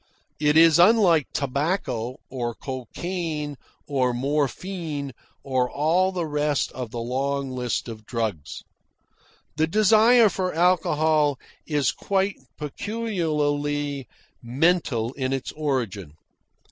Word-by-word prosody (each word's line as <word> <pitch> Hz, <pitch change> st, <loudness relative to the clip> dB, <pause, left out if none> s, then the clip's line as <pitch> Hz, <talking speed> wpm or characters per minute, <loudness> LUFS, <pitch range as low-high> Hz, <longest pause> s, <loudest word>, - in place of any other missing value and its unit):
It 150 Hz, 0 st, +3 dB
is 165 Hz, 0 st, +7 dB
unlike 180 Hz, -, +5 dB
tobacco, 135 Hz, -, -2 dB
or 120 Hz, -3 st, -4 dB
cocaine, 150 Hz, +4 st, -4 dB, 0.3 s
or 130 Hz, -4 st, 0 dB
morphine, 145 Hz, +2 st, -2 dB, 0.3 s
or 130 Hz, -2 st, 0 dB
all 170 Hz, +6 st, +2 dB
the 180 Hz, -3 st, -2 dB
rest 150 Hz, -1 st, 0 dB
of 125 Hz, -3 st, -6 dB
the 120 Hz, -, -7 dB
long 135 Hz, +3 st, -2 dB
list 125 Hz, -1 st, -2 dB
of 110 Hz, -2 st, -9 dB
drugs. 110 Hz, -, -3 dB, 0.9 s
The 160 Hz, +1 st, +2 dB
desire 220 Hz, +5 st, +5 dB
for 185 Hz, -4 st, -2 dB
alcohol 155 Hz, -4 st, +2 dB, 0.3 s
is 145 Hz, -6 st, +1 dB
quite 195 Hz, 0 st, -1 dB, 0.2 s
peculiarly 145 Hz, -, -2 dB, 0.3 s
mental 125 Hz, -2 st, +1 dB
in 130 Hz, -1 st, -2 dB
its 135 Hz, -1 st, -3 dB
origin. 120 Hz, -, -3 dB
145 Hz, 105 wpm, -24 LUFS, 130-170 Hz, 0.9 s, is